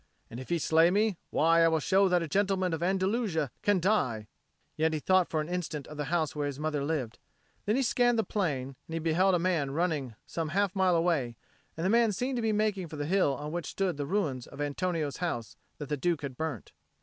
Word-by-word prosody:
And 115 - -7
if 130 - -9
he 170 - +2
slay 165 +1 +4
me, 205 0 +1
why, 165 +1 +4
I - - +6
will 160 -1 +2
show 195 +4 +3
that 180 -1 +2
a - - -4
gentleman 190 +1 +1
of 165 - -3
Andalusia 190 - 0
can 205 -2 +2
die;" 145 - +1 0.5
yet 160 +1 +1
he 155 - -1
thought 185 +3 +3
for 155 - 0
an 150 - -5
instant 170 -5 -3
of 150 - -10
the 150 0 -3
house 160 -1 -1
where 145 -1 -1
his 140 -1 -5
mother 150 -2 -1
lived. 140 -7 -3 0.5
Then 210 - +3
he 270 - +2
scanned 240 -1 +2
the 225 - +2
plain, 150 -11 -2 0.2
and 160 - -8
he - - -1
beheld 175 +4 +3
a - - +3
man 170 -5 0
running 145 -6 -1
some 165 -2 -3
half 200 -2 +1
mile 185 -2 +3
away; 165 -8 +1 0.4
and 165 - -2
the - - +2
man 230 -1 +4
seemed 250 +6 -2
to - - -1
be 225 -1 +1
making 210 -4 0
for 155 - -9
the 145 -1 -3
hill 165 -5 +2
on 150 +3 -6
which 175 0 -4
stood 185 -6 -1
the 145 -1 -3
ruins 150 -10 -1
of - - -13
Antonio's 145 0 -2
house 120 -11 -3 0.2
that 145 - -6
the 150 - -2
Duke 165 +2 0
had 135 -2 -5
burnt. 155 -6 -4
165 Hz, 235 wpm, -29 LUFS, 145-190 Hz, 0.5 s, I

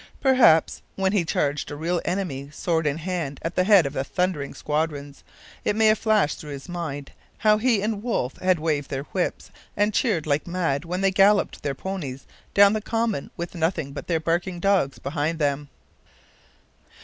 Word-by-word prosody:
Perhaps 255 - +4
when 190 -1 +1
he 200 -4 +2
charged 145 -2 -1
a 145 - -5
real 170 +3 -1
enemy, 145 -8 -3
sword 160 0 -1
in 145 +1 0
hand, 165 -5 -3
at 165 - -2
the 185 - +2
head 195 -5 +6
of 140 - -3
thundering 180 -6 -1
squadrons, 150 -2 -3 0.4
it 210 - 0
may 220 0 +3
have 215 0 +4
flashed 215 -8 +2
through 150 - -9
his 135 -1 -9
mind 155 -6 -5 0.3
how 215 -1 +3
he 225 -4 +2
and 210 -1 -1
Wolfe 210 - -2
had 185 -1 +2
waved 150 -3 -1
their 135 0 -3
whips 180 +4 -3 0.3
and 205 +1 +2
cheered 200 - +1
like 150 +1 0
mad 170 -4 -1
when 180 +3 -3
they 195 0 +3
galloped 200 +2 +3
their 140 -1 -2
ponies 145 -6 -5 0.3
down 200 0 +7
the 215 - -1
common 225 -7 -1
with 170 0 -5
nothing 160 -4 -1
but - - -7
their 165 -2 +1
barking 175 +3 -1
dogs 190 -7 +2
behind 150 +3 -2
them. 145 -1 -1
170 Hz, 180 wpm, -24 LUFS, 145-195 Hz, 0.4 s, down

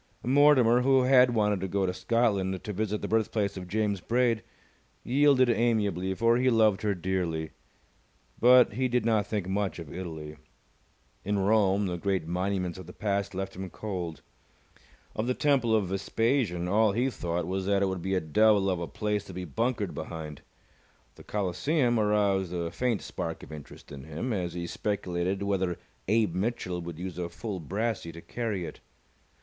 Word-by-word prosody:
Mortimer, 130 -2 +5
who 135 0 +4
had 125 -2 +5
wanted 105 -2 +2
to 95 - -2
go 95 +1 0
to 90 - -1
Scotland 100 -4 0
to 105 - -4
visit 105 +1 -2
the - - -1
birthplace 110 -2 0
of 90 -2 -7
James 100 0 -1
Braid, 120 0 +1 0.6
yielded 135 0 +4
amiably, 105 -6 +1
for 115 +3 +3
he 130 +1 +3
loved 110 -4 +3
her 105 -2 0
dearly. 85 -3 -2 0.9
But 125 -2 +6
he 130 +4 0
did 125 -2 0
not 110 -3 +2
think 105 -4 -2
much 95 0 -1
of 80 -4 -8
Italy. 80 -4 -7 0.9
In 100 +2 0
Rome, 100 0 +3
the 90 -2 -3
great 95 -3 -1
monuments 90 +1 -2
of 90 - -10
the 90 - -10
past 100 -2 -2
left 95 0 -4
him 95 0 -6
cold. 90 -8 -5 0.9
Of 110 - -2
the 125 - +1
Temple 135 -6 +2
of 100 -5 0
Vespasian, 100 -2 0
all 105 +2 +3
he 125 +5 +1
thought 85 -5 -3
was 95 +2 -3
that 100 -1 +2
it - - +2
would 95 -2 -3
be 95 +2 -1
a - - +3
devil 100 +4 +3
of 90 - -1
a 85 - -4
place 105 -1 -2
to 95 - -10
be 90 0 -4
bunkered 105 - -1
behind. 80 -2 -7 0.7
The - - -15
Colosseum 120 - 0
aroused 100 -3 +2
a 85 -2 -3
faint 125 -5 -1
spark 80 0 -5
of - - -11
interest 75 -2 -11
in 70 -1 -9
him, 80 +11 -3
as 90 -4 -2
he 85 -1 -3
speculated 95 0 -2
whether 95 -3 0 0.3
Abe 110 -3 +2
Mitchell 90 -2 -2
would 85 -2 -7
use 90 0 -6
a 85 -1 -3
full 105 0 -5
brassey 100 +2 -3
to 85 - -10
carry 105 -6 -3
it. - - -9
100 Hz, 175 wpm, -28 LUFS, 90-115 Hz, 0.9 s, But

